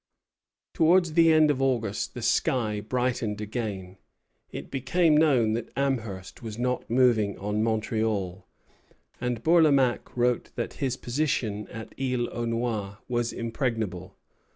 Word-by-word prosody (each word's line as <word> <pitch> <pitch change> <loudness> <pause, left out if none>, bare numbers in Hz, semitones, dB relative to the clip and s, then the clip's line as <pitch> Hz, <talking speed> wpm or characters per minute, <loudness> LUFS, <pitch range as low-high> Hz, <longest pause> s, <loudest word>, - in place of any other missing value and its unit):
Towards 170 0 +3
the 165 0 +6
end 155 -1 +5
of 135 -2 -2
August 120 -6 -1
the 120 - -6
sky 110 -3 +1
brightened 120 -2 -1
again. 105 -4 -5 0.5
It - - -8
became 150 +5 +2
known 135 -8 +4
that 115 0 -3
Amherst 115 -10 -3
was 110 -2 -7
not 125 +1 -2
moving 115 -5 +3
on 105 +2 -2
Montreal, 110 -4 -1 0.7
and 125 -2 -2
Bourlamaque 145 -8 +3
wrote 120 0 +1
that 120 - -3
his 130 -2 0
position 120 -6 -1
at 110 -1 -9
Isle 125 -2 0
aux 120 0 -2
Noix 115 -4 -2
was 120 -1 -1
impregnable. 115 -6 -3
120 Hz, 130 wpm, -27 LUFS, 110-130 Hz, 0.7 s, the